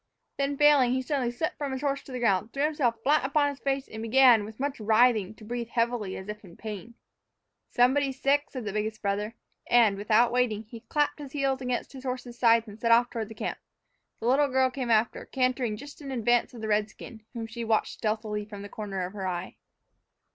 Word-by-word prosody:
Then, 280 Hz, 0 st, -1 dB
failing, 285 Hz, -4 st, +5 dB
he 260 Hz, 0 st, 0 dB
suddenly 260 Hz, -3 st, -1 dB
slipped 280 Hz, +7 st, -3 dB
from 285 Hz, -2 st, -2 dB
his 265 Hz, -, -4 dB
horse 280 Hz, -1 st, -1 dB
to -, -, -11 dB
the 255 Hz, -, -4 dB
ground, 225 Hz, -3 st, +1 dB
threw 280 Hz, -, -1 dB
himself 295 Hz, -6 st, +1 dB
flat 300 Hz, +2 st, +3 dB
upon 285 Hz, +1 st, +2 dB
his 280 Hz, -1 st, -7 dB
face, 275 Hz, 0 st, -1 dB
and 220 Hz, -, -8 dB
began, 235 Hz, -1 st, +6 dB
with 220 Hz, +2 st, -11 dB
much 280 Hz, -1 st, -2 dB
writhing, 220 Hz, -1 st, +3 dB
to 220 Hz, -, -15 dB
breathe 235 Hz, +1 st, -4 dB
heavily, 230 Hz, -4 st, -1 dB
as 190 Hz, -, -8 dB
if 210 Hz, 0 st, -7 dB
in 175 Hz, -3 st, -14 dB
great -, -, -22 dB
pain. 220 Hz, +1 st, -7 dB, 0.8 s
"Somebody's 265 Hz, +2 st, +2 dB
sick," 285 Hz, +1 st, +2 dB
said 255 Hz, -4 st, -6 dB
the 205 Hz, -, -3 dB
biggest 215 Hz, +1 st, -3 dB
brother, 205 Hz, +2 st, -1 dB, 0.3 s
and, 225 Hz, -5 st, +5 dB
without 220 Hz, +4 st, +3 dB
waiting, 240 Hz, -4 st, +1 dB
he 225 Hz, +1 st, -11 dB
clapped 295 Hz, +6 st, -1 dB
his 280 Hz, -2 st, -9 dB
heels 270 Hz, -2 st, 0 dB
against 250 Hz, +1 st, -3 dB
his 265 Hz, -1 st, -10 dB
horse's 250 Hz, -2 st, -5 dB
sides 230 Hz, -1 st, +4 dB
and 210 Hz, +1 st, -11 dB
set 230 Hz, 0 st, +1 dB
off 240 Hz, +1 st, +5 dB
toward 225 Hz, -2 st, -4 dB
the 225 Hz, -, -10 dB
camp. -, -, -4 dB, 0.6 s
The -, -, -6 dB
little 275 Hz, +4 st, +4 dB
girl 260 Hz, -1 st, +2 dB
came 255 Hz, -2 st, -4 dB
after, 225 Hz, +1 st, +2 dB
cantering 255 Hz, -4 st, 0 dB
just 285 Hz, +4 st, -11 dB
in 280 Hz, -, -7 dB
advance 240 Hz, 0 st, +1 dB
of 230 Hz, -, -9 dB
the 220 Hz, -, -3 dB
redskin, 210 Hz, +1 st, -2 dB
whom 230 Hz, -2 st, -4 dB
she 230 Hz, +1 st, -6 dB
watched 220 Hz, -1 st, +1 dB
stealthily 215 Hz, -1 st, -2 dB
from 205 Hz, -1 st, -9 dB
the 205 Hz, -, -8 dB
corner 195 Hz, -4 st, -4 dB
of 180 Hz, -, -8 dB
her 195 Hz, -2 st, -4 dB
eye. 180 Hz, 0 st, -4 dB
240 Hz, 220 wpm, -28 LUFS, 215-265 Hz, 0.8 s, began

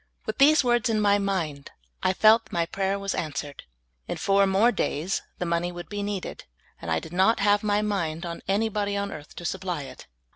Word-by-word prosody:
With 220 Hz, -, -4 dB
these 295 Hz, +2 st, +6 dB
words 240 Hz, -1 st, +2 dB
in 220 Hz, -1 st, +1 dB
my 205 Hz, -1 st, +3 dB
mind, 170 Hz, -8 st, -2 dB, 0.3 s
I -, -, +2 dB
felt 220 Hz, +3 st, +5 dB
that -, -, -21 dB
my 170 Hz, -1 st, +1 dB
pra3'er 195 Hz, +3 st, -1 dB
was 200 Hz, 0 st, -2 dB
answered. 145 Hz, -2 st, -5 dB, 0.4 s
In -, -, -3 dB
four 195 Hz, 0 st, +3 dB
more 200 Hz, +5 st, +4 dB
days 170 Hz, -4 st, -1 dB, 0.2 s
the 180 Hz, -, -3 dB
money 170 Hz, +1 st, 0 dB
would 175 Hz, 0 st, -9 dB
be 205 Hz, -1 st, -4 dB
needed, 200 Hz, -2 st, -5 dB, 0.4 s
and 85 Hz, -, -6 dB
I 80 Hz, -, +2 dB
did 160 Hz, -, -11 dB
not 190 Hz, +6 st, +3 dB
have 205 Hz, +1 st, +3 dB
m}^ 210 Hz, 0 st, +1 dB
mind 170 Hz, -5 st, -2 dB
on 170 Hz, -1 st, -6 dB
any 205 Hz, +4 st, +2 dB
bod}^ 205 Hz, -1 st, -1 dB
on 200 Hz, 0 st, -3 dB
earth 150 Hz, -3 st, -10 dB
to 175 Hz, -, -8 dB
supply 180 Hz, -4 st, -3 dB
it. -, -, -11 dB
195 Hz, 215 wpm, -26 LUFS, 170-210 Hz, 0.4 s, these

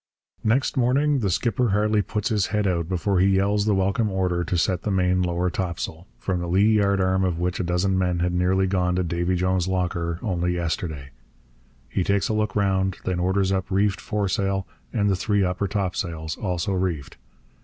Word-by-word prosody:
Next 130 Hz, +5 st, +1 dB
morning 135 Hz, +3 st, +2 dB
the 100 Hz, -5 st, 0 dB
skipper 120 Hz, +5 st, +1 dB
hardly 105 Hz, +1 st, +2 dB
puts 105 Hz, +2 st, -2 dB
his 105 Hz, -4 st, +1 dB
head 105 Hz, -1 st, 0 dB
out 85 Hz, -3 st, 0 dB
before 95 Hz, +1 st, 0 dB
he 95 Hz, +1 st, +4 dB
yells 100 Hz, +2 st, +2 dB
the 105 Hz, -, +3 dB
welcome 100 Hz, +4 st, +1 dB
order 90 Hz, -2 st, 0 dB
to 90 Hz, +1 st, -1 dB
set 90 Hz, 0 st, +1 dB
the -, -, -3 dB
main 90 Hz, -1 st, +2 dB
lower 90 Hz, 0 st, 0 dB
topsail 85 Hz, -1 st, -4 dB
from 95 Hz, -2 st, -2 dB
the 85 Hz, -, -3 dB
lee 105 Hz, +5 st, +4 dB
yardarm 95 Hz, -2 st, +2 dB
of 90 Hz, -3 st, 0 dB
which 90 Hz, +1 st, -1 dB
a -, -, 0 dB
dozen 90 Hz, +2 st, +1 dB
men 90 Hz, -1 st, +1 dB
had 90 Hz, +1 st, 0 dB
nearly 90 Hz, +2 st, +2 dB
gone 90 Hz, -1 st, +1 dB
to 90 Hz, -, +1 dB
Davy 85 Hz, +2 st, -1 dB
Jones's 90 Hz, 0 st, +1 dB
locker 85 Hz, -2 st, -1 dB
only 90 Hz, -4 st, 0 dB
yesterday. 80 Hz, -5 st, -3 dB, 0.8 s
He 90 Hz, +8 st, -1 dB
takes 100 Hz, -1 st, +1 dB
a -, -, +1 dB
look 105 Hz, -1 st, -1 dB
round; 95 Hz, -2 st, +1 dB
then 90 Hz, -1 st, -1 dB
orders 95 Hz, +2 st, +1 dB
up 95 Hz, 0 st, -1 dB
reefed 100 Hz, +1 st, +1 dB
foresail 100 Hz, -2 st, -1 dB, 0.3 s
and 105 Hz, -4 st, +1 dB
the 100 Hz, -, +3 dB
three 100 Hz, +2 st, +1 dB
upper 90 Hz, +2 st, -1 dB
topsails, 85 Hz, -5 st, -3 dB
also 90 Hz, -2 st, -2 dB
reefed. 90 Hz, -7 st, -2 dB
95 Hz, 190 wpm, -24 LUFS, 90-100 Hz, 0.8 s, he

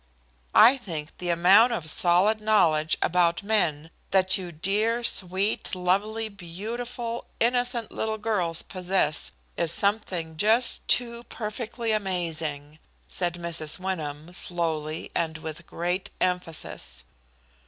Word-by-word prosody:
"I 250 Hz, +4 st, +8 dB
think 160 Hz, -9 st, -6 dB
the 180 Hz, -, -2 dB
amount 190 Hz, +8 st, +5 dB
of 170 Hz, -9 st, -4 dB
solid 180 Hz, +7 st, +3 dB
knowledge 160 Hz, -8 st, +3 dB
about 175 Hz, +1 st, +2 dB
men 165 Hz, -7 st, 0 dB, 0.2 s
that 190 Hz, -1 st, +3 dB
you 180 Hz, -2 st, -4 dB
dear, 210 Hz, +8 st, 0 dB
sweet, 195 Hz, 0 st, -1 dB
lovely, 200 Hz, +5 st, 0 dB
beautiful, 230 Hz, +5 st, -6 dB
innocent 245 Hz, -1 st, 0 dB
little 220 Hz, 0 st, -2 dB
girls 185 Hz, -7 st, +1 dB
possess 185 Hz, -4 st, 0 dB, 0.3 s
is 170 Hz, -1 st, 0 dB
something 180 Hz, -6 st, -1 dB
just 225 Hz, +6 st, +2 dB
too 235 Hz, -1 st, +3 dB
perfectly 230 Hz, +1 st, -4 dB
amazing!" 160 Hz, -7 st, -3 dB, 0.3 s
said 175 Hz, -2 st, -2 dB
Mrs. 170 Hz, -3 st, -2 dB
Wyndham, 165 Hz, -4 st, -5 dB
slowly, 160 Hz, -3 st, 0 dB
and 160 Hz, -2 st, -1 dB
with 160 Hz, +1 st, -8 dB
great 175 Hz, +2 st, -3 dB
emphasis. 165 Hz, -, -1 dB
185 Hz, 110 wpm, -26 LUFS, 165-215 Hz, 0.3 s, I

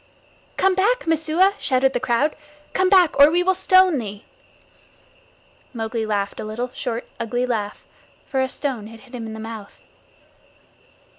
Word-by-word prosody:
"Come 385 Hz, 0 st, +3 dB
back, 450 Hz, +7 st, +1 dB
Messua!" 325 Hz, +4 st, +2 dB
shouted 265 Hz, 0 st, +2 dB
the -, -, 0 dB
crowd. 255 Hz, +4 st, +1 dB, 0.4 s
"Come 375 Hz, 0 st, +2 dB
back, 360 Hz, -7 st, +4 dB
or 285 Hz, +1 st, +9 dB
we 350 Hz, +3 st, +2 dB
will 375 Hz, +1 st, +3 dB
stone 370 Hz, -4 st, +4 dB
thee." 205 Hz, -2 st, -7 dB, 1.5 s
Mowgli 225 Hz, 0 st, -3 dB
laughed 200 Hz, -2 st, -2 dB
a -, -, -4 dB
little 235 Hz, +4 st, -4 dB
short 235 Hz, -1 st, -4 dB
ugly 245 Hz, +2 st, -1 dB
laugh, 215 Hz, -4 st, -3 dB, 0.4 s
for 265 Hz, -2 st, -1 dB
a 260 Hz, -, 0 dB
stone 250 Hz, -7 st, -3 dB
had 225 Hz, 0 st, -13 dB
hit 260 Hz, -1 st, -19 dB
him 235 Hz, -2 st, -6 dB
in 220 Hz, -, -7 dB
the 220 Hz, -, -8 dB
mouth. 220 Hz, -2 st, -9 dB
255 Hz, 155 wpm, -22 LUFS, 225-330 Hz, 1.5 s, or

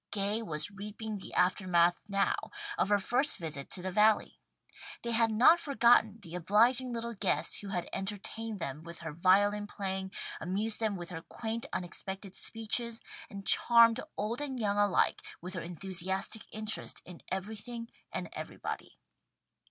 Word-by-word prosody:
Gay 205 Hz, +2 st, 0 dB
was 155 Hz, -3 st, -2 dB
reaping 210 Hz, +1 st, -6 dB
the -, -, -7 dB
aftermath 180 Hz, -2 st, +3 dB
now, 200 Hz, -1 st, +1 dB, 0.4 s
of -, -, 0 dB
her 205 Hz, -, +5 dB
first 245 Hz, +8 st, +1 dB
visit 150 Hz, -5 st, -6 dB
to 180 Hz, -, -3 dB
the 185 Hz, -, -3 dB
Valley. 215 Hz, +2 st, +3 dB, 0.6 s
They 235 Hz, -, -2 dB
had 230 Hz, 0 st, +3 dB
not 250 Hz, +10 st, +6 dB
forgotten 235 Hz, -6 st, +4 dB
the 170 Hz, -2 st, -10 dB
obliging 230 Hz, +8 st, +3 dB
little 235 Hz, 0 st, -3 dB
guest 205 Hz, -, 0 dB
who 205 Hz, -, -8 dB
had 180 Hz, -3 st, -3 dB
entertained 205 Hz, +2 st, -5 dB
them 150 Hz, -3 st, -5 dB
with 170 Hz, +1 st, -10 dB
her 160 Hz, -2 st, -6 dB
violin 205 Hz, +5 st, +3 dB
playing, 190 Hz, -2 st, -4 dB, 0.3 s
amused 205 Hz, +5 st, 0 dB
them 220 Hz, -3 st, 0 dB
with 175 Hz, -1 st, -6 dB
her 165 Hz, -1 st, -6 dB
quaint 230 Hz, +7 st, -5 dB
unexpected 190 Hz, +2 st, -5 dB
speeches, 225 Hz, +1 st, +3 dB, 0.3 s
and 200 Hz, -1 st, -9 dB
charmed 235 Hz, 0 st, +7 dB, 0.2 s
old 225 Hz, +6 st, -2 dB
and 270 Hz, -3 st, -4 dB
young 205 Hz, -2 st, 0 dB
alike 205 Hz, -2 st, +2 dB, 0.2 s
with 180 Hz, +2 st, -6 dB
her 175 Hz, -, -3 dB
enthusiastic 190 Hz, +4 st, 0 dB
interest 215 Hz, 0 st, -3 dB
in 180 Hz, -2 st, -11 dB
everything 220 Hz, +4 st, -5 dB, 0.2 s
and -, -, -4 dB
everybody. -, -, -7 dB
205 Hz, 150 wpm, -31 LUFS, 185-225 Hz, 0.6 s, charmed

